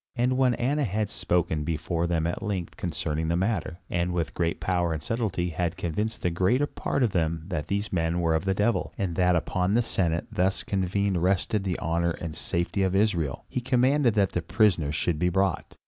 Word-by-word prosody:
And 125 +1 +1
when 130 -2 +3
Annas 140 +2 0
had 105 +1 -1
spoken 85 -6 0
before 85 +2 -1
them 85 -2 0
at 85 - -2
length 95 -5 -3
concerning 80 +1 -2
the 85 - +1
matter, 95 -4 -1
and 85 +1 -1
with 85 -2 -2
great 85 -2 -1
power 85 0 0
and 80 - -3
subtilty 95 -1 -1
had 85 +1 -2
convinced 105 +7 -2
the 90 - +1
greater 95 +11 +2
part 140 - -2
of 115 - +2
them 80 -2 0
that 85 -6 -3
these 100 +1 -2
men 85 0 +1
were 85 -2 +2
of 80 +3 0
the 95 0 +1
devil, 105 +4 0
and 95 -5 -1
that 90 0 +3
upon 90 +3 0
the 120 - +3
Senate 85 -6 0
thus 95 +2 0
convened 95 -1 0
rested 95 +3 +1
the 95 -3 -1
honor 85 +1 0
and 80 -2 -5
safety 85 +3 -1
of 95 0 +1
Israel, 85 -10 +1
he 125 - -3
commanded 130 0 +3
that 100 -3 +3
the 85 - -1
prisoners 90 -5 +2
should 80 0 0
be 90 - +2
brought. 95 0 -1
90 Hz, 205 wpm, -27 LUFS, 85-105 Hz, -, when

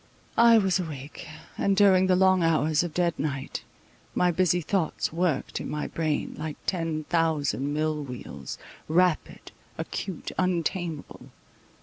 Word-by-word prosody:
I 230 0 +8
was 190 -3 +2
awake, 155 -1 -7 0.3
and 200 -1 +2
during 190 -2 +6
the 185 - +4
long 185 0 +4
hours 160 -2 +3
of 175 -1 -3
dead 175 +1 +1
night, 140 -3 -3 0.5
my 180 0 +3
busy 180 0 +2
thoughts 170 -2 -1
worked 165 -4 -1
in - - -5
my 150 0 -2
brain, 155 -2 -2
like 155 -1 -4
ten 165 -4 -1
thousand 150 -4 0
mill 155 0 0
wheels, 125 -4 -7 0.3
rapid, 175 +1 +1 0.3
acute, 190 -5 -5
untameable. 175 -3 -2
165 Hz, 130 wpm, -27 LUFS, 150-185 Hz, 0.5 s, I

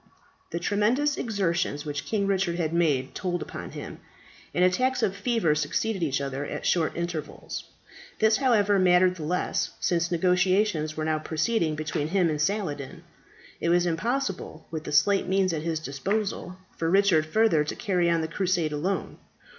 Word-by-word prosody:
The 170 - -3
tremendous 220 +11 +1
exertions 175 - -1
which 145 -1 -4
King 205 -3 0
Richard 190 -3 +1
had 165 -2 -1
made 145 -6 +1
told 175 -3 -2
upon - - -7
him, - - -8 0.5
and 180 - +3
attacks 255 +8 +1
of 195 - +1
fever 205 -6 +1
succeeded 195 +6 -1
each 140 -4 0
other 140 0 -3
at - - -5
short 165 -2 +1
intervals. 170 -3 -5 0.5
This, 220 0 +4
however, 210 -7 +3
mattered 180 0 +4
the 160 - -6
less, 180 +4 -1
since 170 -1 +1
negotiations 180 -2 +1
were 155 - -1
now 155 -1 +1
proceeding 160 +1 0
between 150 -1 -2
him 175 -1 +2
and 150 -1 -2
Saladin. 160 -7 -2 0.6
It 170 - 0
was 175 +1 +3
impossible, 195 - -2
with 160 -1 -5
the - - -5
slight 195 +7 +3
means 190 -1 +2
at 155 - -2
his 160 0 -2
disposal, 185 +6 -3 0.2
for 165 - -1
Richard 185 -4 +4
further 205 -4 +3
to 150 - -4
carry 180 -5 +1
on 165 -1 +2
the 160 - -2
crusade 175 -2 0
alone. 165 +7 -2
175 Hz, 165 wpm, -26 LUFS, 155-200 Hz, 0.6 s, This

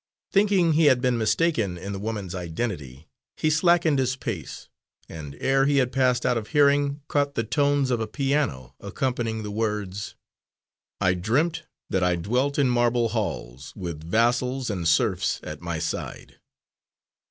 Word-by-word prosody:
Thinking 195 -5 +3
he 160 +1 +4
had 130 -4 +5
been 125 -1 +1
mistaken 110 - +1
in 100 +3 -6
the 95 - -5
woman's 105 -4 -4
identity, 80 - -5 0.3
he 155 - +1
slackened 165 -2 +3
his 130 -1 +1
pace, 100 - -6 0.4
and 75 -3 -8
ere 135 0 +2
he 145 -1 +2
had 125 -2 +2
passed 125 -2 +2
out 125 -2 +2
of 110 - -9
hearing, 145 -1 +3
caught 145 -1 0
the 115 - 0
tones 140 +2 +1
of 120 - +1
a 110 - -2
piano, 135 - -1
accompanying 115 +1 -2
the 105 - -5
words, 105 -2 -3 0.9
_"I 95 -1 +4
dreamt 125 - 0 0.3
that 95 - +1
I 90 -1 +2
dwelt 125 +11 0
in 140 -2 +3
marble 120 -1 +2
halls, 65 - -4
With 85 -5 -6
vassals 120 +6 +1
and 90 -4 -2
serfs 90 +2 +2
at 75 -1 -7
my 85 -1 -3
s 80 0 -1
i - - -4
i - - -14
de." - - -23
115 Hz, 165 wpm, -25 LUFS, 90-140 Hz, 0.9 s, had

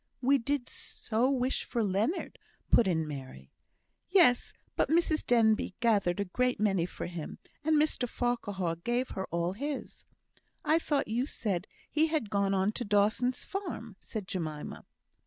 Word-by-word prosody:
"We 275 +2 +4
did 265 +1 -1
so 235 +3 -1
wish 260 -1 0
for 235 -3 -1
Leonard," 205 - -1 0.3
put 230 - +6
in 160 -4 +1
Mary. 130 - -8 0.6
"Yes! 345 -10 +5 0.2
but - - +2
Mrs 320 -1 +3
Denbigh 220 -5 +3
gathered 205 -7 +2
a 200 - +1
great 250 +7 0
many 195 -5 +2
for - - -6
him. 175 -3 -6 0.3
And 310 0 +4
Mr 295 -5 +1
Farquhar 205 -9 -1
gave 240 +8 -1
her 190 - -3
all 170 +2 -1
his." 280 +6 -5 0.6
"I 315 +2 +4
thought 295 -4 0
you 240 +5 0
said 195 - -2 0.2
he 310 +2 +3
had 305 -10 -1
gone 200 -1 +2
on 190 +2 +2
to 240 - -3
Dawson's 215 +4 +2
farm," 330 - -5
said 210 -4 -6
Jemima. 155 -6 -4
225 Hz, 155 wpm, -31 LUFS, 190-260 Hz, 0.6 s, put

